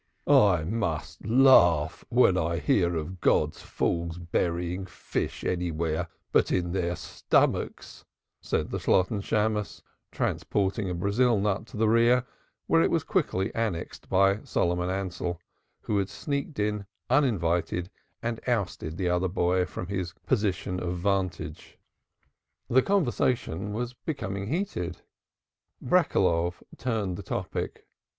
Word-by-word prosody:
"I 95 -6 +5
must 85 -5 -3
laugh 90 - +5
when 120 -6 +5
I 85 -1 0
hear 90 -5 +2
of 85 +3 -5
God's 75 0 +2
fools 85 0 -2
burying 85 +2 -2
fish - - -4
anywhere 85 -1 -1 0.2
but - - +3
in 85 -1 0
their 85 -1 -1
stomach," - - 0 0.6
said - - -1
the - - -2
Shalotten 100 +3 +2
Shammos, 105 0 -1 0.3
transporting 100 0 -1
a 90 - -2
Brazil 105 +5 +2
nut 105 +2 -1
to 120 - -10
the 110 +1 +3
rear, 120 +3 +4 0.4
where - - +4
it - - +3
was - - +1
quickly 95 +1 0
annexed 110 -7 -3
by 95 +2 +3
Solomon 90 +1 0
Ansell, 90 -2 -3 0.4
who 105 - 0
had 95 0 -1
sneaked 140 +1 -4
in 105 -1 -1 0.2
uninvited 90 - +1 0.3
and 115 -1 -2
ousted 95 -9 -1
the 95 -2 -1
other 90 +1 +1
boy 90 0 +1
from - - -6
his 90 -2 -3
coign 100 -5 -1
of 90 0 -3
vantage. 90 -5 -2 0.9
The 130 +2 +6
conversation 120 - 0
was 120 +3 -3
becoming 100 - -4
heated; 135 - -3 0.8
Breckeloff 85 +1 +2
turned 110 -7 -2
the - - -6
topic. 90 - -4
95 Hz, 125 wpm, -27 LUFS, 85-110 Hz, 0.9 s, The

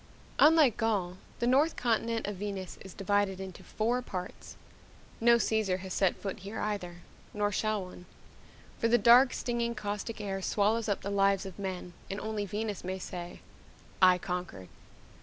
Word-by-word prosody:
Unlike 305 -6 +6
Gaul, 195 -5 0 0.2
the - - -1
north 280 +6 +3
continent 230 -1 0
of 205 -2 -4
Venus 195 -2 -5
is 190 -2 -11
divided 200 -1 0
into 190 -2 -8
four 235 +3 -1
parts. 185 -7 -7 0.6
No 235 +1 +6
Caesar 215 -5 +1
has 185 0 -7
set 190 -3 +2
foot 200 +1 -5
here 200 +3 -6
either, 180 -5 -3 0.3
nor 205 0 +1
shall 215 0 0
one 180 0 -12 0.7
for 230 - +2
the 240 +1 +5
dank, 245 +2 +7
stinging, 235 -1 -2
caustic 210 +2 -4
air 195 -2 -3
swallows 215 +3 +1
up 200 - 0
the 200 - -4
lives 195 0 +2
of 190 0 -9
men 185 -2 -5 0.2
and 195 - -3
only 210 -1 -3
Venus 210 +1 -3
may 185 +1 -3
say, 175 -1 -7 0.6
I 185 -1 +7
conquered. 180 - -5
205 Hz, 160 wpm, -30 LUFS, 190-225 Hz, 0.7 s, dank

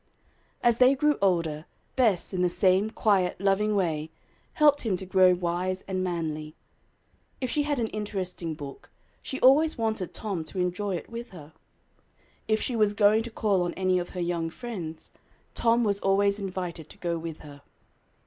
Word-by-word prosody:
As 235 -1 +3
they 255 +2 +6
grew 295 +2 +2
older, 165 -5 +1 0.3
Bess, 215 -8 +2
in 180 - -1
the 180 - +3
same 185 +3 +3
quiet, 200 -5 +1
loving 200 +2 +2
way, 160 -5 -1 0.4
helped 295 -1 +4
him 205 -6 0
to 190 - -7
grow 185 -1 +5
wise 180 +2 -2
and 185 -1 -2
manly. 155 -4 -3 0.8
If 255 -3 -2
she 300 - +1
had 290 -1 -1
an 235 - 0
interesting 185 -6 -4
book, 145 -3 -10 0.3
she 265 - -5
always 300 +5 +5
wanted 220 -5 -2
Tom 195 -7 -4
to 190 - -9
enjoy 185 +2 -1
it 170 - -6
with 235 +1 -6
her. 160 -5 -12 0.9
If 215 0 +2
she 250 - -2
was 210 -2 +2
going 210 +1 +4
to 235 - -6
call 205 -4 +1
on 175 0 -2
any 185 -1 +1
of 175 - -5
her - - -2
young 170 -1 -1
friends, 175 -7 -7 0.4
Tom 235 +1 +2
was 200 -2 +1
always 200 +1 +2
invited 180 -5 -5
to - - -13
go 170 -1 -2
with 160 -1 -7
her. 145 -1 -12
190 Hz, 175 wpm, -27 LUFS, 175-220 Hz, 0.9 s, they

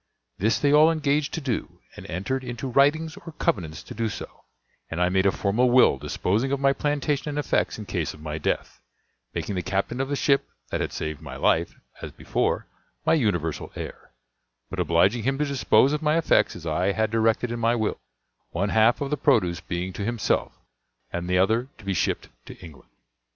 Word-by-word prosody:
This 110 +4 +2
they 145 0 +2
all 155 +2 +7
engaged 150 -2 0
to 165 - -3
do, 130 -6 -3 0.2
and - - -10
entered 115 +10 -2
into 120 +1 -5
writings 150 +5 +2
or 170 -4 -10
covenants 80 - -2
to - - -9
do 115 0 -1
so; - - -9 0.4
and 85 - -4
I 90 0 +3
made 95 +1 +2
a - - +4
formal 110 +7 +1
will 120 - +5
disposing 110 - -1
of 140 - 0
my 135 0 +3
plantation 145 +1 -1
and 145 - -4
effects 150 - 0
in - - -7
case - - -3
of - - -15
my 75 0 -5
death, - - -2 0.5
making - - -2
the 90 - -1
captain 100 +7 -1
of 135 - -2
the 145 - 0
ship 140 0 +2 0.2
that - - -1
had - - -2
saved 80 -2 -4
my - - -8
life, 85 +1 +1 0.3
as - - -6
before, - - -1 0.4
my - - +4
universal 90 - 0
heir, - - -8 0.6
but - - -4
obliging 95 +8 +3
him 135 +4 0
to 150 - +1
dispose 135 -1 +3
of 150 - -1
my 155 +1 +2
effects 165 - +3
as 85 - -10
I 90 +5 +1
had 110 +1 0
directed 115 +1 +1
in 120 - -3
my 115 +1 +2
will, 110 -2 -1 0.5
one 100 +4 -1
half 110 +5 +4
of 140 0 -2
the 150 - +1
produce 95 - +2
being 90 +1 -4
to 100 - -4
himself, 115 +1 0 0.6
and 85 +1 -3
the 90 - +3
other 110 +7 +2
to 110 - -15
be 100 - 0
shipped 90 - -1 0.2
to - - -9
England. 80 -7 -14
115 Hz, 205 wpm, -25 LUFS, 90-140 Hz, 0.6 s, all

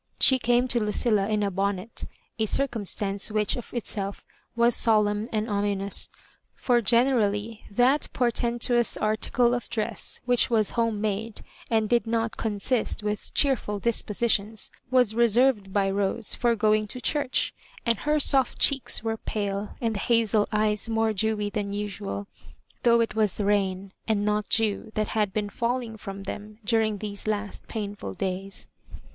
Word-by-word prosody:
She 260 -1 +5
came 245 +1 +2
to 240 - +3
Lucilla 210 -1 +1
in 210 -1 +1
a 200 - 0
bonnet 195 +3 -2 0.2
— - - -42
a 220 - +1
circumstance 205 -6 -1
which 210 -1 +1
of 245 - -8
itself 205 -4 -3 0.3
was 235 0 +4
solemn 210 0 +2
and 215 0 -1
ominous, 200 -2 0 0.5
for 240 -2 +2
generally 225 -2 +1
that 250 +7 +2
portentous 240 0 +1
article 225 +3 +2
of 245 -1 -3
dress, 215 -2 -2
which 245 0 +3
was 220 -3 +2
home 230 -3 0
made 215 +1 -3 0.3
and 220 -2 +2
did 235 0 +2
not 225 0 -1
consist 215 +1 -1
with 210 -1 -3
cheerful 255 -7 +2
dispositions, 215 -1 0 0.2
was 250 -4 +3
reserved 235 -2 +3
by 195 0 +2
Rose 200 +3 -1
for 235 -1 +2
going 215 0 +2
to 250 - -7
church; 280 +1 0 0.3
and 230 -3 +1
her 300 +1 +1
soft 270 -2 +2
cheeks 275 -5 +2
were 225 0 -1
pale, 205 -1 -3
and 230 -2 0
the 205 - -3
hazel 220 -2 +2
eyes 210 0 0
more 225 -1 +1
dewy 210 0 0
than 200 -1 -3
usual, 205 0 -4 0.6
though 235 -1 +4
it 225 -2 -1
was 215 -3 0
rain, 195 -2 0 0.2
and 210 -2 +1
not 210 0 0
dew, 220 0 +1
that 215 -1 0
had 210 -3 0
been 210 +1 -2
falling 235 0 -2
from 195 -2 -8
them 210 +2 -7
during 220 -2 +1
those 205 0 -6
last 210 -1 -3
painflil 205 - -5
days. 190 +1 -3
215 Hz, 155 wpm, -26 LUFS, 205-235 Hz, 0.6 s, She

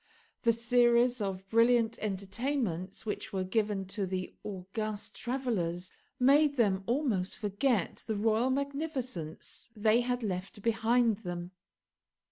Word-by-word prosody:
The 235 - +4
series 240 +1 +3
of 190 -1 -3
brilliant 230 +1 +3
entertainments 200 - -2
which 215 0 -3
were 190 -2 -1
given 205 0 0
to 195 -1 -1
the 185 0 -3
august 210 +2 -5
travellers 200 -9 -2 0.3
made 285 +3 +5
them 200 -6 +2
almost 235 -8 0
forget 210 0 0
the 220 - 0
royal 220 +4 +2
magnificence 265 - -3
they 215 +2 +4
had 245 0 -1
left 195 0 -4
behind 230 0 +3
them. 175 -3 -5
220 Hz, 115 wpm, -31 LUFS, 195-245 Hz, 0.3 s, made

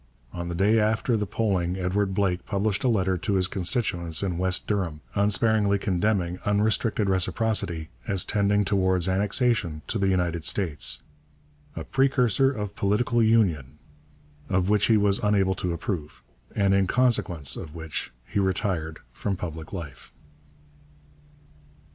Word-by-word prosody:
On 85 0 -5
the 85 - -4
day 105 +5 +3
after 110 +3 +1
the 105 -2 -1
polling 95 -4 -1
Edward 95 +1 -1
Blake 95 -3 0
published 100 0 -1
a - - +2
letter 95 -5 +1
to 100 +3 -1
his 90 -1 +2
constituents 90 -4 -1
in 90 -3 -2
West 95 0 0
Durham, 90 -7 -2
unsparingly 105 0 +2
condemning 90 -2 -1
unrestricted 105 +1 +1
reciprocity 95 -3 0 0.2
as 95 -2 0
tending 105 0 +1
towards 95 -2 +1
annexation 100 - +1
to 115 - -3
the 100 - +1
United 90 -3 0
States 80 -5 +1 0.7
'a - - -5
precursor 135 -2 +2
of 105 -5 -5
political 115 +4 +1
Union' 90 - +2 0.7
of 95 0 +1
which 105 -1 +3
he 110 - +4
was 100 0 +2
unable 100 -4 +2
to 90 -1 -3
approve, 85 -2 -5 0.3
and 100 -2 +2
in 100 -1 +2
consequence 105 - +2
of 80 0 -8
which 80 -1 -5
he 100 - -2
retired 95 -4 -1
from 100 - -3
public 80 -3 -7
life. 80 -9 -8
95 Hz, 140 wpm, -25 LUFS, 90-105 Hz, 0.7 s, he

